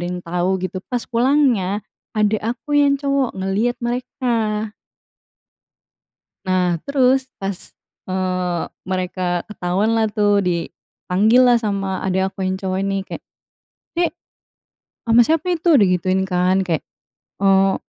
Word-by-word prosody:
ada 175 - -3
yang 180 0 -4
tahu, 175 +2 0
gitu. 185 +1 -3
Pas 245 -1 -1
pulangnya, 235 -6 +2 0.3
adik 210 0 +2
aku 245 +6 -3
yang 280 -1 +3
cowok 275 -3 0
ngeliat 200 +6 0
mereka. 235 -4 -2 1.7
Nah, 180 -2 +1
terus, 265 -1 +2 0.2
pas 195 -1 -5 0.3
eee, 185 -2 -1 0.2
mereka 180 -1 -2
ketahuan 205 +3 0
lah 225 - +3
tuh, 205 -1 +2
dipanggil 180 +5 0
lah 245 -1 +6
sama 195 -4 -2
adik 190 0 +1
aku 190 0 -5
yang 190 0 -2
cowok 190 -1 -2
ini. 195 0 -1
Kayak, 190 - -8 0.8
“Dek, 345 - +2 1.0
ama 230 +1 +7
siapa 325 +3 +1
itu?” 335 -2 +2
Digituin, 185 -4 +3
kan. 185 0 +1
Kayak, 165 -4 -2 0.5
eee 195 0 +4
195 Hz, 125 wpm, -20 LUFS, 185-240 Hz, 1.7 s, ama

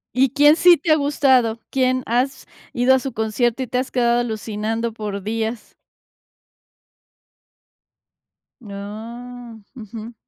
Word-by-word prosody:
¿Y 260 0 +3
quién 295 +3 +5
sí 350 0 +7
te 315 +3 -1
ha - - +7
gustado? 260 -6 +2
¿Quién 255 -1 0
has 260 +3 -1 0.3
ido 245 +2 +3
a 265 - +3
su 270 -1 -6
concierto 225 +3 -1
y - - -6
te 250 - -2
has 255 +1 -2
quedado 240 -1 +2
alucinando 225 0 -3
por 210 -2 -5
días? 225 +1 -4 2.9
Oh. 225 +3 -9 0.2
Ujú. 225 0 -9
240 Hz, 125 wpm, -21 LUFS, 220-260 Hz, 2.9 s, sí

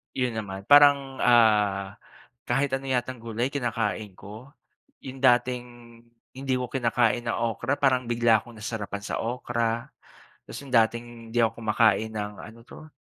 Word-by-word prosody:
'Yun 125 -2 0
naman 95 -2 -6
parang 140 0 +5
ah, 105 -5 +3 0.5
kahit 135 +3 0
ano 135 0 -2
yatang 130 -1 -2
gulay 115 +2 -3
kinakain 110 -6 -3
ko. 110 +9 -12 0.5
'Yung 135 0 -8
dating 125 -1 +2 0.7
hindi 135 0 -2
ko 125 -1 -5
kinakain 120 -1 0
na 115 - -1
okra 115 +3 -1
parang 130 -3 +1
bigla 115 -1 +3
akong 120 +2 -12
nasarapan 105 -2 -5
sa - - -4
okra. 120 -1 -2 0.6
Tapos - - -8
'yung 135 -2 -12
dating 115 +1 +3 0.3
hindi 120 - -2
ako 115 0 +2
kumakain 110 0 +2
ng 105 -1 -4
ano 115 +2 -11
'to, 155 +6 -13
120 Hz, 150 wpm, -26 LUFS, 110-130 Hz, 0.7 s, parang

